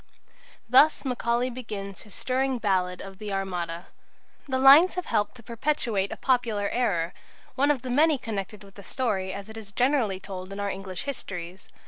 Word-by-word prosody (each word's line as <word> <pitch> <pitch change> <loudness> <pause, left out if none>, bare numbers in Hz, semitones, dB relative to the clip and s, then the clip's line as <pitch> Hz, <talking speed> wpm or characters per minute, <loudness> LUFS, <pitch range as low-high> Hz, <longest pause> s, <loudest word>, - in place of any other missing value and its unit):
Thus 280 +6 +5
Macaulay 245 -1 0
begins 210 -5 -6
his 210 -3 -10
stirring 260 0 0
ballad 185 -4 0
of 195 0 -10
the 210 -1 -5
Armada. 180 -3 -3 0.6
The 260 -1 0
lines 280 +8 +8
have 360 - -3
helped 205 +3 0
to 240 - -14
perpetuate 230 -4 -1
a - - -5
popular 235 -6 +1
error 180 -9 0 0.4
one 275 +3 +2
of 275 -4 +1
the 255 - -4
many 300 +3 +4
connected 210 -3 -5
with 195 -1 -15
the 200 - -11
story 195 -6 -1
as 200 +1 -7
it 220 0 -10
is 210 -3 -7
generally 245 -5 +1
told 190 -1 -8
in 200 - -6
our 200 0 -1
English 190 -2 -6
histories. 185 -9 -6
215 Hz, 175 wpm, -26 LUFS, 195-255 Hz, 0.6 s, lines